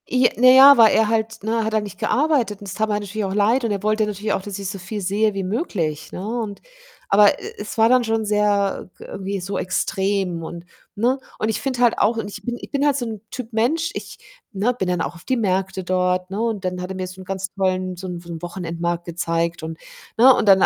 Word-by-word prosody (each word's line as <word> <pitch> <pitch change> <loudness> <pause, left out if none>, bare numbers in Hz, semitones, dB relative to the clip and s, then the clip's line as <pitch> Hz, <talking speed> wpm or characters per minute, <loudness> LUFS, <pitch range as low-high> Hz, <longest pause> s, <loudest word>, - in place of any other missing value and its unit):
I 250 -1 +3
naja, 260 +3 +8
weil 225 -2 +7
er 220 - +4
halt 220 -1 -1
ne, 225 +1 0
hat 220 0 -2
halt 215 -1 +1
nicht 200 -3 -9
gearbeitet 265 -8 +1
und 205 - -10
es 190 - -5
tat 220 +2 0
mir 210 - +1
natürlich 210 +1 -4
auch 190 - -3
leid 220 +6 +2
und 230 - 0
er 200 -1 -2
wollte 215 0 +2
natürlich 210 0 -2
auch, - - -1
dass 200 0 -6
ich 195 -2 -4
so 195 0 -6
viel 205 +3 -5
sehe 205 +3 +1
wie 195 -1 -3
möglich, 170 - -2
ne, 185 - -6 0.2
und 205 -3 -6 0.5
aber, 205 0 +6
e - - -8
e - - -12
es 210 +2 -7
war 225 0 +5
dann 250 -1 +4
schon 225 0 0
sehr, 205 -2 +1
äh, - - -10
g - - -11
irgendwie 195 0 -4
so 195 +3 -4
extrem 190 -2 -1
und 170 +1 -8 0.3
ne? 245 +6 +1 0.2
Und 215 - 0
ich 220 - -1
finde 260 -3 -2
halt 240 -2 +4
auch 220 +3 +2
und 210 -2 -3
ich 205 - -9
bin 240 +2 -3
ich - - -10
bin 280 0 +1
halt 290 -2 +3
so 255 -3 -2
'n 220 -3 -6
Typ 245 -2 -6
Mensch, 310 +10 +1
ich - - -7 0.4
ne, 210 +6 +1
bin 195 -6 -3
dann 180 -1 0
auch - - -3
auf 170 - -15
die 260 - +1
Märkte 190 -3 -1
dort, 180 0 0
ne, 200 - -3
und 225 -4 -1
dann 180 0 -3
hat 180 - -5
er 190 - -5
mir 185 0 -4
so 185 +1 -11
'n - - -11
ganz 190 0 -4
tollen 185 -1 -1
so 185 +2 -6
'n 175 -1 -5
so 170 - -14
'n 165 -1 -7
Wochenendmarkt 170 -1 -3
gezeigt 170 -1 -2
und, 160 0 -6 0.4
ne, 255 +3 +8
und 215 - 0
dann 190 -1 +7
205 Hz, 260 wpm, -21 LUFS, 185-225 Hz, 0.5 s, naja